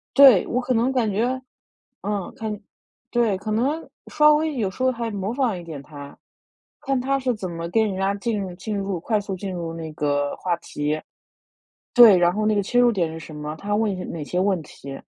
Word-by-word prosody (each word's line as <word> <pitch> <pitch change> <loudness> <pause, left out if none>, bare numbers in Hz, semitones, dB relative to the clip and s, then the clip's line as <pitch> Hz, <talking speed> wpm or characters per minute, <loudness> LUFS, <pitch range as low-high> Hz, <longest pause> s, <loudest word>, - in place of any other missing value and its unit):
对， 265 -9 +8
我 250 - 0
可 255 0 0
能 240 +3 +2
感 240 -5 +1
觉 245 +6 0 0.6
嗯， 205 -2 -3
看 215 -2 -4 0.5
对， 230 -5 +2
可 215 +2 -5
能 275 +9 0 0.2
稍 300 0 +5
微 310 0 0
有 205 -5 0
时 255 - -6
候 260 - +4
还 235 -2 -3
模 200 +1 -3
仿 245 -7 0
一 - - -8
点 155 -5 -8
他， 145 0 -11 0.7
看 270 -3 0
他 275 +2 0
是 255 -2 0
怎 185 -4 -5
么 170 0 -5
跟 220 +2 +2
人 195 - -3
家 195 +1 0
进 215 0 -2
入 185 -2 -4
进 205 +3 -4
入 195 -3 -2
快 215 +4 0
速 195 -1 -5
进 190 +1 -5
入 165 -2 -4
那 160 -1 -6
个 145 -1 0
话 175 -2 -1
题。 150 -1 -3 1.0
对， 235 -6 +9
然 175 0 +4
后 215 +2 -1
那 215 - +3
个 205 - +1
切 245 +5 0
入 240 -1 +5
点 170 -5 -1
是 165 - -6
什 155 - -10
么， 150 +1 -5
他 205 +4 -3
问 215 0 +2
一 190 - -3
些 185 - -5
哪 160 -3 -5
些 180 - -3
问 190 -3 +1
题， 135 -2 -10
200 Hz, 240 characters per minute, -23 LUFS, 175-240 Hz, 1.0 s, 对